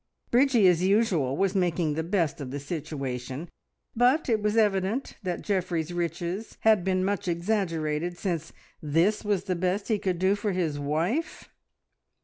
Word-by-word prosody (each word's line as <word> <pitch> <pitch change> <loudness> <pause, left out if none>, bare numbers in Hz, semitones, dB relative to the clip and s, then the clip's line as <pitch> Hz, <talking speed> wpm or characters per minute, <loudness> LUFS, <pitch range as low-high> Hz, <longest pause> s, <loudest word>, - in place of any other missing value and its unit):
Bridgie 245 -5 +5
as 175 -2 +4
usual 185 - +2
was 195 -1 +1
making 175 -5 +1
the 160 - -1
best 170 -3 -1
of 135 - -5
the 140 +2 -4
situation, 140 -1 -5 0.4
but 250 +6 +3
it 220 -2 +2
was 210 +1 0
evident 205 +3 +1
that 180 -4 -3
Geoffrey's 180 -4 -1
riches 175 +4 -3
had 220 -4 +4
been 185 0 +1
much 200 0 -1
exaggerated, 170 -3 -1
since 170 -5 -3 0.3
this 165 +8 +1
was 205 -3 0
the 185 -2 -1
best 185 +5 -1
he 215 -2 +2
could 185 -3 -1
do 190 +2 +3
for 205 0 -1
his 160 -5 -1
wife. 165 - -2
180 Hz, 155 wpm, -27 LUFS, 160-205 Hz, 0.4 s, Bridgie